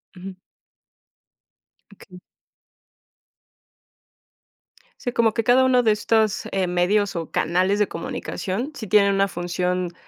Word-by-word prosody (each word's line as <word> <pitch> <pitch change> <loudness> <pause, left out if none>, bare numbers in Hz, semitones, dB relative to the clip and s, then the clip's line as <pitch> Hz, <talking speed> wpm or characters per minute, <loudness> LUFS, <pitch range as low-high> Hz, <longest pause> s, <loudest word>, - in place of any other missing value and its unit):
Ujú. 185 +1 -10 1.6
Okey. 180 -2 -15 2.8
Sí, 245 - -3
como 225 -3 +2
que 230 -2 -2
cada 250 +2 +5
uno 255 -1 +3
de 225 - +3
estos, 215 0 0
eh, 190 -2 0
medios 190 +3 +1
o 165 -2 -5
canales 185 +4 +1
de 210 - +2
comunicación, 245 - -5
sí 220 - -7
tienen 200 0 +3
una 195 0 +1
función, 180 0 -3
195 Hz, 115 wpm, -22 LUFS, 180-225 Hz, 2.8 s, cada